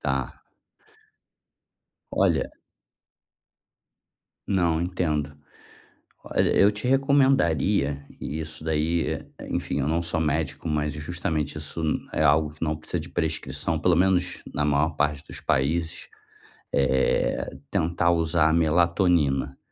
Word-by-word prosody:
Tá. 65 -1 -3 1.7
Olha - - +1 2.0
Não, 85 -5 +1
entendo. 75 -5 -1 0.9
Olha, - - +1
eu 100 - +6
te 105 +3 -6
recomendaria, 105 - +2
e 75 - -4
isso 80 0 -6
daí 80 +1 0 0.3
enfim, - - -2
eu 70 - 0
não 80 +2 +1
sou 85 -1 -2
médico, 80 0 -1
mas 75 -2 -1
justamente 75 -1 -3
isso 75 +2 -5 0.3
é - - 0
algo 75 0 +3
que 75 - -6
não 80 -1 0
precisa 80 +3 -4
de 85 +3 -7
prescrição, 80 -1 -2
pelo 85 +2 +3
menos 90 0 +1
na 75 - 0
maior 75 +2 +1
parte 75 0 0
dos - - -6
países, 80 +5 -1 0.6
eh, 65 -1 +1 0.2
tentar 85 +1 +1
usar 80 -1 +2
a - - +2
melatonina. 85 -4 +2
80 Hz, 115 wpm, -25 LUFS, 75-85 Hz, 2.0 s, eu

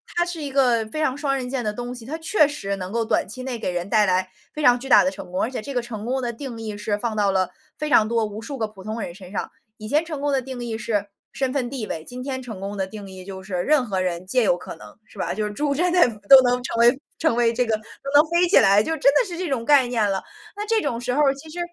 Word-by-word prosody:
它 345 - +3
是 350 -2 -5
一 280 - -4
个 245 -5 +3
非 310 +8 -5
常 270 -3 0
双 280 -2 0
刃 250 -2 -3
剑 255 -3 -2
的 210 - -1
东 245 +2 -5
西， 230 -2 -10
它 295 - -4
确 320 -2 +3
实 240 -10 -4
能 185 -1 -6
够 230 +1 0
短 220 - 0
期 230 +6 -8
内 255 -2 -4
给 215 -5 -3
人 175 +2 -3
带 215 -2 +4
来 185 0 +1 0.2
非 305 - -5
常 245 -3 +5
巨 270 - -8
大 245 - +7
的 185 - +2
成 190 -2 -10
功， 185 +2 -1
而 225 - 0
且 260 - -4
这 280 +6 -6
个 245 - 0
成 225 -2 -7
功 260 +2 -1
的 240 - -2
定 235 -1 -7
义 215 -2 -5
是 210 0 -1
放 225 -1 -2
到 205 -1 +3
了 190 -1 +1 0.3
非 305 - -2
常 215 -7 +5
多 230 0 +1
无 210 0 -6
数 275 +2 -6
个 220 - 0
普 205 -3 -14
通 215 +2 -4
人 175 - -6
身 185 -2 -12
上。 200 - -3 0.3
以 215 - -8
前 300 +5 +2
成 310 -4 -5
功 290 0 0
的 275 - +2
定 255 -1 -7
义 230 -2 -3
是 210 -3 -1 0.3
身 265 -2 -1
份 255 -3 -1
地 255 -5 -4
位， 160 - -5
今 250 0 -7
天 260 -1 -4
成 220 -7 -8
功 200 +1 -5
的 190 -1 -1
定 200 0 -9
义 185 -1 -10
就 190 -1 -8
是 190 -1 -5
任 295 -3 +3
何 195 -5 -2
人 180 -1 -2
皆 250 +7 +1
有 195 -6 +3
可 180 - -8
能， 105 0 -14
是 210 - -16
吧？ - - -1
就 215 +2 -2
是 210 - -3
猪 285 +5 -1
真 350 +4 +1
的 360 - +3 0.3
都 270 -1 +11
能 245 0 +1
成 240 - -3
为 240 +2 +5 0.2
成 320 -8 +2
为 235 -1 +3
这 250 +1 +1
个 225 -1 +1
都 215 - -9 0.3
能 290 - +9
飞 345 +1 +3
起 385 - +2
来， 200 -1 +5
就 320 +9 -1
真 280 -2 +4
的 480 - +3
是 350 -2 -6
这 360 -2 -3
种 245 -4 -1
概 285 -2 +6
念 225 -4 +1
了。 195 -1 -1 0.3
那 415 +1 -4
这 445 0 +2
种 235 - -2
时 250 0 -1
候 295 - +2
儿 275 0 +3
其 300 +3 -12
实 340 +3 -7
240 Hz, 330 characters per minute, -23 LUFS, 205-275 Hz, 0.3 s, 都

